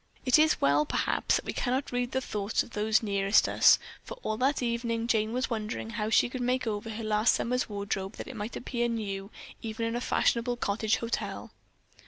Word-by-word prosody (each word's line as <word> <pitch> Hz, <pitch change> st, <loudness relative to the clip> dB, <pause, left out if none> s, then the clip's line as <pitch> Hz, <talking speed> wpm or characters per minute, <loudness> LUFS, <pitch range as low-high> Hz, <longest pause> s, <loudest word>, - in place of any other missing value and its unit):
It 255 Hz, +3 st, +5 dB
is 310 Hz, 0 st, +4 dB
well, 145 Hz, +2 st, +3 dB
perhaps, -, -, 0 dB
that -, -, -2 dB
we -, -, -3 dB
cannot 260 Hz, +2 st, -1 dB
read 245 Hz, 0 st, -1 dB
the 260 Hz, -, 0 dB
thoughts 210 Hz, -4 st, -1 dB
of -, -, -15 dB
those 220 Hz, +1 st, +1 dB
nearest 200 Hz, -1 st, +3 dB
us, -, -, +6 dB, 0.3 s
for -, -, -8 dB
all 215 Hz, -, -1 dB
that 265 Hz, +2 st, +1 dB
evening 235 Hz, -1 st, -1 dB
Jane 220 Hz, -2 st, +1 dB
was 255 Hz, +1 st, -2 dB
wondering 220 Hz, 0 st, -3 dB
how 215 Hz, -1 st, -2 dB
she 220 Hz, -, +4 dB
could 255 Hz, +1 st, -5 dB
make 250 Hz, +1 st, 0 dB
over 215 Hz, 0 st, -3 dB
her 220 Hz, +1 st, -5 dB
last 215 Hz, +1 st, +3 dB
summer's 250 Hz, 0 st, -1 dB
wardrobe 200 Hz, -2 st, -3 dB
that -, -, -8 dB
it 265 Hz, -, -8 dB
might 215 Hz, +1 st, -5 dB
appear 240 Hz, -1 st, -2 dB
new 200 Hz, -4 st, -3 dB, 0.3 s
even 225 Hz, 0 st, -3 dB
in 230 Hz, +1 st, -2 dB
a 240 Hz, -, -2 dB
fashionable 240 Hz, 0 st, +1 dB
cottage 215 Hz, 0 st, 0 dB
hotel. 230 Hz, 0 st, -4 dB
230 Hz, 205 wpm, -29 LUFS, 210-245 Hz, 0.3 s, us